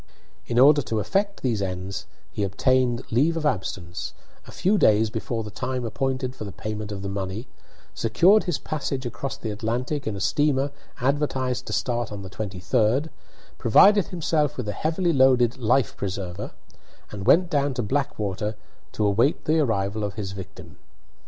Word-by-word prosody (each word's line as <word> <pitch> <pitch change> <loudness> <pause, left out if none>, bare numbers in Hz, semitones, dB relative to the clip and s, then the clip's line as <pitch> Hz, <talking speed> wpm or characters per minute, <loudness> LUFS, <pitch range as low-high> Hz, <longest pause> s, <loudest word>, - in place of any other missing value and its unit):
In 120 - -2
order 145 +3 +7
to 115 -4 -2
effect 195 - -1
these 115 -6 0
ends 95 0 -4 0.2
he - - -4
obtained 120 +5 +1
leave 150 +8 +2
of 155 - -3
absence 95 -8 -3 0.3
a - - -10
few 205 +3 +1
days 110 -3 +4
before 115 0 -3
the 105 - -8
time 130 +3 -3
appointed 130 +3 -2
for - - -7
the 100 - -6
payment 105 +1 -5
of 100 -1 -5
the - - -3
money, 100 +3 -4 0.5
secured 200 +5 +4
his 175 -5 0
passage 135 -3 -3
across 120 +3 -4
the 110 - -4
Atlantic 120 +7 -2
in 110 - -2
a - - -5
steamer 140 +5 +1 0.3
advertised 130 -2 0
to 105 - -4
start 120 +3 -1
on 100 -1 -6
the 95 - -9
23d, 110 - 0 0.5
provided 200 - +6
himself 155 -4 0
with 125 -4 -3
a - - 0
heavily 165 - 0
loaded 130 -3 +4
"life 120 +1 +2
preserver," 95 -2 -4 0.6
and 100 -2 -6
went 180 +1 +5
down 140 -3 +1
to 120 - -1
Blackwater 105 -4 -2 0.4
to 105 - 0
await 115 +9 +2
the 160 +1 +3
arrival 105 -6 0
of 100 -1 -3
his 100 -3 -4
victim. 95 0 -10
120 Hz, 165 wpm, -25 LUFS, 105-140 Hz, 0.6 s, order